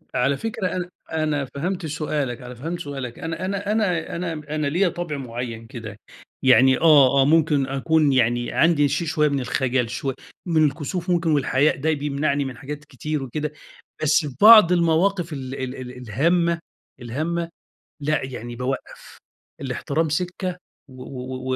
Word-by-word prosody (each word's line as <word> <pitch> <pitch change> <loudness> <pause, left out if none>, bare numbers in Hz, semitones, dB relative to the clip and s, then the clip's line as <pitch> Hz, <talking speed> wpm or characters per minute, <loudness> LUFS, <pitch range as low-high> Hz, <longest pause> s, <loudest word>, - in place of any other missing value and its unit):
على 135 +3 +2
فكرة 215 +1 -3
أنا 180 -1 -3 0.2
أنا 155 -3 0
فهمت 170 +7 -4
سؤالك، 150 -5 -2
أنا 125 0 -9
فهمت 165 +8 -5
سؤالك 135 -6 -6
أنا 165 +3 -4
أنا 200 +1 -2
أنا 190 -7 0
أنا 170 -1 -3 0.2
أنا 150 -1 -1
ليّا 175 +6 +2
طبع 170 -4 -4
معيّن 120 -3 -6
كده، 110 -3 -9 0.4
يعني 130 0 +6
آه، 140 -4 +6
آه - - +4
ممكن 150 -2 +3
أكون 145 +2 +2
يعني 120 -1 +1
عندي 160 -3 +3
شي 145 +5 -1
شويّة 150 -1 +2
من 140 -1 0
الخجل 125 -1 0
شوي 135 +3 -3 0.3
من 160 -3 +3
الكسوف 160 +5 -3
ممكن 170 -2 +2
والحياء 145 0 +2
ده 160 +4 +1
بيمنعني 145 -1 -1
من 130 -2 -6
حاجات 145 +2 -7
كتير 150 +1 -4
وكده، 150 +3 -4 0.5
بس 155 +1 +3
فبعض 200 - +8
المواقف 170 0 +2
ال 135 -2 -5
ال 130 -1 -4
ال 125 -1 -8
الهامة، 170 - +1 0.4
الهامة 160 +8 -2 0.5
لأ 150 +1 0
يعني 120 -2 -7
بوقّف 130 +2 -5 0.4
الاحترام 140 +4 -1
سكّة، 180 +3 -2 0.3
و 130 - -16
و 130 0 -5
145 Hz, 155 wpm, -23 LUFS, 130-165 Hz, 0.5 s, فبعض